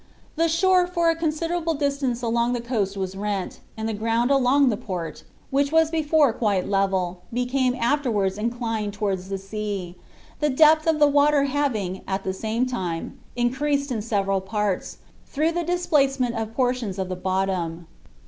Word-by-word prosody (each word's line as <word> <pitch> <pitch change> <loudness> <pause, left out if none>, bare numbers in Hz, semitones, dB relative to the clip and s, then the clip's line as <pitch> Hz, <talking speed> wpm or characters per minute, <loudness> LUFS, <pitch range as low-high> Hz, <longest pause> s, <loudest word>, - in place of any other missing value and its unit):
The 330 +1 +2
shore 360 +2 +3
for 340 -2 +2
a - - -2
considerable 330 +1 -1
distance 280 -4 -1
along 235 +1 +1
the 245 - -1
coast 215 -5 -2
was 190 -1 -3
rent, 200 -1 -3 0.2
and 220 0 -3
the 225 - -2
ground 230 +4 0
along 270 0 +4
the 220 - +1
port, 180 -5 -6 0.3
which 280 +1 +1
was 320 0 +4
before 310 -5 +3
quite 205 -5 0
level, 190 -3 0
became 250 +1 0
afterwards 235 -7 0
inclined 225 -2 -2
towards 195 -3 -2
the 195 - -2
sea, 195 -2 -5 0.5
the 300 - +2
depth 310 +3 +5
of 320 -1 +3
the 295 -1 +5
water 290 0 +4
having, 255 -10 -1
at 195 0 -2
the 190 - -2
same 220 +5 -1
time, 180 -10 -4 0.2
increased 280 +3 0
in 225 -4 -1
several 195 -3 0
parts, 205 -1 -2 0.3
through 310 +3 0
the 345 +1 -1
displacement 280 -8 +1
of 225 -1 -4
portions 245 -6 0
of 190 -1 -2
the 185 - -3
bottom. 185 -3 -2
235 Hz, 165 wpm, -24 LUFS, 195-290 Hz, 0.5 s, depth